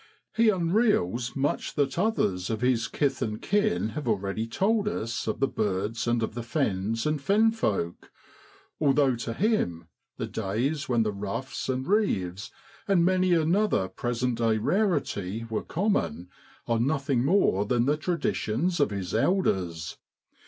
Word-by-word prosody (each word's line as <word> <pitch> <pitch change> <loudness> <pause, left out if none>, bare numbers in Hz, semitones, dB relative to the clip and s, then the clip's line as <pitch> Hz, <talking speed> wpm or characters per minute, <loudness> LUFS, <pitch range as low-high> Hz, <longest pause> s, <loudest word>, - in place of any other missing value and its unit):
He 230 0 +4
unreels 170 - +1
much 140 +1 -1
that 140 +2 0
others 100 - 0
of 110 -1 -2
his 125 -2 +2
kith 145 -3 -1
and 105 0 -2
kin 205 - +1
have 145 +4 -5
already 105 +1 -1
told 210 - +1
us 115 - -3
of 110 - -2
the 135 - +3
birds 105 +2 -2
and 120 -1 +1
of 110 - -3
the 120 - -4
fens 115 -4 -1
and 150 -1 0
fenfolk, 200 - +1 0.7
although 140 -3 +3
to 115 - -4
him 90 - 0 0.3
the - - -2
days 120 +9 -2
when 120 -2 +3
the 105 -1 -1
ruffs 100 +8 -4
and 130 0 -1
reeves, 105 - 0 0.4
and 185 -4 +4
many 185 0 +3
another 170 - +2
present 120 +3 -2
day 115 -2 +2
rarity, 115 - 0
were 110 - -1
common, 155 - -1 0.4
are 115 -1 +1
nothing 135 -1 +1
more 140 - +3
than 120 0 +2
the 145 +2 +2
traditions 170 -1 -1
of 145 - +3
his 100 -3 -4
elders. 95 - 0
125 Hz, 145 wpm, -27 LUFS, 105-175 Hz, 0.7 s, He